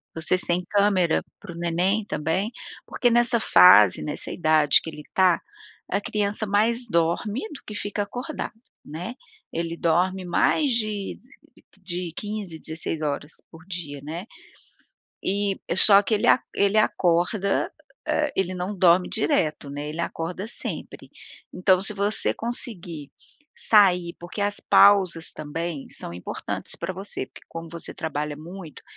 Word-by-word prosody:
Vocês 165 +3 0
têm 175 +1 0
câmera 200 -5 +3 0.2
para 195 - -9
o - - -10
neném 180 +5 0
também? 165 +7 -1 0.3
Porque 245 - +1
nessa 240 0 +3
fase, 105 - +7
nessa 150 - -5
idade 155 -3 +4
que 160 - -6
ele 150 -1 -10
tá, 185 -2 +4 0.5
a 200 +2 0
criança 210 +1 -1
mais 225 +4 +1
dorme 170 +7 0
do - - -10
que 210 - -8
fica 205 0 -3
acordado, 250 +7 -5 0.3
né. 175 +11 -6 0.4
Ele 165 0 -3
dorme 180 +3 +1
mais 265 - +2
de 215 -3 -2 0.4
de - - -21 0.2
de 175 -2 -5
15, 205 -6 -5
16h 155 -2 -4 0.2
por 160 +1 -14
dia, 160 -7 -6
né. 165 +6 -6 1.0
E, 200 0 0 0.2
só 200 +1 +7
que 220 - -4
ele 210 - +1 0.3
ele 200 +1 +2
acorda, 185 +1 +1 0.4
eh, 305 -1 +1
ele 185 -1 0
não 185 +3 -4
dorme 180 0 +5
direto, 160 - 0
né, 145 +1 -5
ele 160 +3 -4
acorda 175 +4 -4
sempre. - - -6 0.4
Então, 185 0 +3
você 200 +1 -1
conseguir 180 - -5 0.5
sair, 180 -5 +4
porque 175 +4 -7
as 205 0 -1
pausas 185 -5 +5
também 155 0 -5
são 85 - -8
importantes 90 - -6
pra - - -4
você, 195 +3 -5
porque - - -15
como 165 0 -7
você 170 -1 -9
trabalha 150 -1 -3
muito, 170 +1 -10
180 Hz, 140 wpm, -24 LUFS, 165-205 Hz, 1.0 s, fase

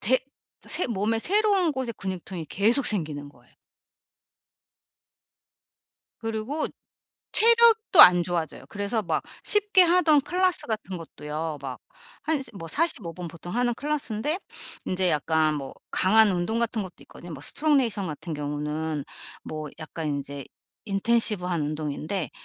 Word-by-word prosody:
대 255 +5 +3 0.5
새 360 - +1
몸에 225 0 0
새로운 395 - +2
곳에 260 -3 -3
근육통이 185 -4 -6
계속 230 - +2
생기는 150 -8 -1
거예요. - - -22 2.7
그리고 225 +7 -2 0.7
체력도 455 -4 +6
안 175 -1 +8
좋아져요. 170 -3 -3
그래서 205 +2 -2
막 165 -4 -1 0.2
쉽게 415 -2 +4
하던 335 -4 +5
클래스 365 +2 0
같은 200 -4 -3
것도요, 155 -1 -5
막 130 -2 -6 0.4
한 315 0 +1
이제 265 - -9
뭐 165 -4 -7
45 260 - 0
분 180 -2 -6
보통 170 +4 -8
하는 245 0 +2
클래스인데 290 - -2 0.5
인제 185 -1 +1
약간 155 +1 +2
뭐 135 -2 -5 0.2
강한 215 +2 +5
운동 180 +6 -1
같은 230 -2 0
것도 185 -2 -9
있거든요. 175 - -12
뭐 140 - -8
스트롱 300 - +1
네이션 210 -6 -1
같은 160 +2 -6
경우는 150 +1 -3 0.4
뭐 155 -1 -5
약간 155 0 -5
인제 140 -1 -4 0.4
인텐시브한 195 -5 +1
운동인데 155 +4 -3
195 Hz, 285 characters per minute, -26 LUFS, 160-260 Hz, 2.7 s, 안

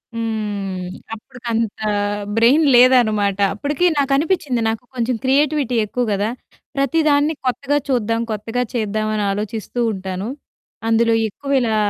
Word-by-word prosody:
హ్మ్. 205 -5 -3 0.3
అప్పటికంత 230 -1 -3 0.7
బ్రెయిన్ 270 +7 +5
లేదనమాట. 215 -6 +4 0.2
అప్పటికి 290 +9 -1
నాకనిపించింది 280 -1 +1
నాకు 225 +2 -3
కొంచెం 240 0 0
క్రియేటివిటీ 275 -1 +2
ఎక్కువ 245 +4 -2
గదా! 205 +2 0 0.5
ప్రతి 275 +4 +1
దాన్ని 290 +2 +3
కొత్తగా 255 +4 0
చూద్దాం, 230 -3 0
కొత్తగా 225 +4 -2
చేద్దాం 215 -2 -1
అని 210 - 0
ఆలోచిస్తూ 215 +3 -4
ఉంటాను. 190 +1 -5 0.6
అందులో 230 0 +3
ఎక్కువిలా 250 -1 0
230 Hz, 110 wpm, -20 LUFS, 215-270 Hz, 0.7 s, బ్రెయిన్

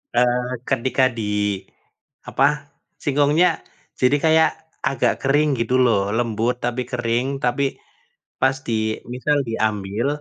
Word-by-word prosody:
eee, 125 0 +2 0.2
ketika 130 +1 +1
diapa 105 +5 -2 0.6
singkongnya 145 +5 +3 0.5
jadi 130 +3 +4
kayak 160 0 +5 0.4
agak 135 - +1
kering 145 +3 +3
gitu 115 +2 0
loh 100 -4 +2
lembut 115 0 0
tapi 120 +1 -1
kering, 120 +1 0 0.2
tapi 125 +3 +1 0.8
pas 130 0 +3
di 110 -1 -1
misal 145 +4 +1
diambil, 110 0 -1
125 Hz, 105 wpm, -21 LUFS, 110-135 Hz, 0.8 s, kayak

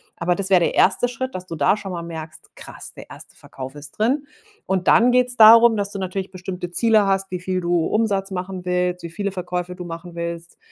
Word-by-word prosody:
Aber 175 +1 0
das 195 0 -2
wär 185 - +6
der 170 - 0
1. 200 +6 +3
Schritt, 255 +2 -5
dass 185 0 -7
du 165 - -6
da 150 +5 +3
schon 195 -2 -7
mal 170 -2 -5
merkst: 160 -2 -9
„Krass, - - -10
der - - -13
1. - - -11
Verkauf 130 +1 -10
ist 145 -1 -9
drin.“ 270 +7 0 0.4
Und 190 -2 -1
dann 245 +2 +5
geht's 250 0 +2
darum, 230 +1 +8
dass 205 -1 -2
du 200 - -6
natürlich 190 0 -4
bestimmte 180 -1 -6
Ziele 220 +1 +3
hast, 195 0 0
wie 180 - -3
viel 185 +1 -2
du 170 -1 +1
Umsatz 200 -3 0
machen 185 0 -5
willst, 180 0 -1
wie 170 - -6
viele 200 +4 -3
Verkäufe 180 -1 -4
du 180 - -8
machen 170 +1 -8
willst. 170 0 -6
185 Hz, 225 wpm, -21 LUFS, 175-205 Hz, 0.4 s, darum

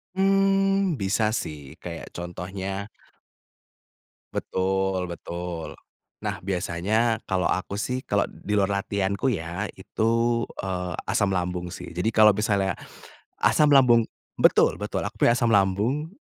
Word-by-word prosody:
Mmm, 195 -1 +3
bisa 110 0 0
sih 75 -7 -6
kayak - - -6
contohnya 95 +3 -5 1.5
Betul, 95 0 0
betul. 85 -1 -5 0.5
Nah - - -3
biasanya 100 +5 0
kalau 95 -1 0
aku 95 +2 -1
sih 125 +4 -2
kalau - - +1
di 105 +1 -4
luar 100 0 +1
latihanku 100 +5 -1
ya 90 -1 -3
itu, 110 +4 -1 0.5
eee, 90 -1 -3
asam 100 - +1
lambung 90 -1 -2
sih. 90 0 -8
Jadi 90 +6 0
kalau 110 -2 +6
misalnya, 100 -3 +1 0.7
asam 150 - +4
lambung 120 -4 +6 0.3
betul - - +4
betul, - - -3
aku - - -5
punya 120 - +5
asam 120 -2 +1
lambung. 110 - +1
100 Hz, 120 wpm, -25 LUFS, 90-115 Hz, 1.5 s, kalau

